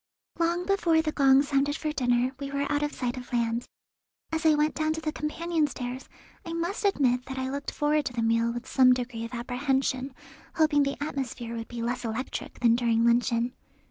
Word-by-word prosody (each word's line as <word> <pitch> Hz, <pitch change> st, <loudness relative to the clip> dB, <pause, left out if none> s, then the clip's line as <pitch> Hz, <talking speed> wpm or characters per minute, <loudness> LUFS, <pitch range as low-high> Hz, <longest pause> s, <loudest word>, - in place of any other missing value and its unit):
Long 340 Hz, +1 st, +1 dB
before 355 Hz, -5 st, +3 dB
the 310 Hz, -, -1 dB
gong 275 Hz, -1 st, +5 dB
sounded 280 Hz, 0 st, +1 dB
for 305 Hz, -1 st, -2 dB
dinner 245 Hz, -2 st, +1 dB
we 280 Hz, -1 st, -4 dB
were 280 Hz, 0 st, -1 dB
out 290 Hz, 0 st, +1 dB
of 295 Hz, 0 st, -1 dB
sight 250 Hz, -2 st, -3 dB
of 250 Hz, 0 st, -9 dB
land. 235 Hz, 0 st, 0 dB, 0.6 s
As 320 Hz, 0 st, +1 dB
I 310 Hz, -, +6 dB
went 300 Hz, +1 st, +2 dB
down 310 Hz, 0 st, 0 dB
the 315 Hz, -1 st, -3 dB
companion 315 Hz, +1 st, -1 dB
stairs 255 Hz, -1 st, -6 dB, 0.3 s
I 335 Hz, -, -6 dB
must 345 Hz, +6 st, -2 dB
admit 255 Hz, -10 st, +2 dB
that 265 Hz, -, -6 dB
I 260 Hz, 0 st, -2 dB
looked 280 Hz, +1 st, -4 dB
forward 295 Hz, 0 st, +1 dB
to 250 Hz, -, -3 dB
the 235 Hz, -1 st, -1 dB
meal 230 Hz, +1 st, +2 dB
with 240 Hz, +1 st, -6 dB
some 255 Hz, -1 st, +5 dB
degree 240 Hz, -2 st, -4 dB
of 230 Hz, -, -9 dB
apprehension, 260 Hz, +1 st, -1 dB, 0.4 s
hoping 310 Hz, -2 st, +4 dB
the 275 Hz, 0 st, 0 dB
atmosphere 250 Hz, -5 st, -4 dB
would 225 Hz, -1 st, -5 dB
be 235 Hz, -1 st, -5 dB
less 245 Hz, +2 st, -2 dB
electric 230 Hz, +3 st, -5 dB
than 235 Hz, -1 st, +5 dB
during 230 Hz, -1 st, +2 dB
luncheon. 235 Hz, 0 st, +2 dB
265 Hz, 200 wpm, -27 LUFS, 240-300 Hz, 0.6 s, I